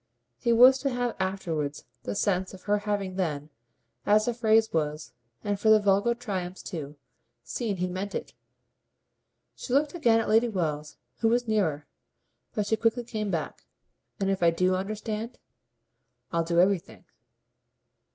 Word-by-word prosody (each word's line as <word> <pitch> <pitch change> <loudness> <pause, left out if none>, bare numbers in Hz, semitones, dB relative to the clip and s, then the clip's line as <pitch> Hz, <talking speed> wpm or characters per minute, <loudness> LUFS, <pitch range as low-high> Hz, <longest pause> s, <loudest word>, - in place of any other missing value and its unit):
He 235 - +1
was 255 +3 +7
to 275 - 0
have 245 -2 -2
afterwards 165 -7 -2 0.2
the 100 - -3
sense 190 - 0
of 185 - -15
her 205 0 +1
having 195 -2 -2
then, 150 -5 -2 0.5
as 210 +1 +4
the 240 - 0
phrase 220 -1 +3
was 150 -2 -2 0.3
and 205 -1 -1
for 220 +1 +6
vulgar 205 +3 +2
triumphs 190 -6 -5
too 150 -5 -6 0.5
seen 220 -6 -3
he 180 - 0
meant 190 +3 -4
it. - - -5 1.2
She 250 - -6
looked 285 +2 +2
again 235 -10 +3
at 225 - -2
Lady 225 +2 +4
Wells, 155 -7 -3 0.2
who 225 - +1
was 240 +1 +2
nearer, 165 -10 0 0.7
but 210 -3 0
she 220 +2 +1
quickly 230 +2 +1
came 215 -3 -3
back. 165 -4 -4 0.5
"And 195 -1 +1
if 195 - -2
I 170 - +6
do 180 +2 +1
understand?" 215 +4 -4 0.9
"I'll 170 0 +1
do 170 +1 +1
everything." 185 0 +1
200 Hz, 150 wpm, -27 LUFS, 175-225 Hz, 1.2 s, was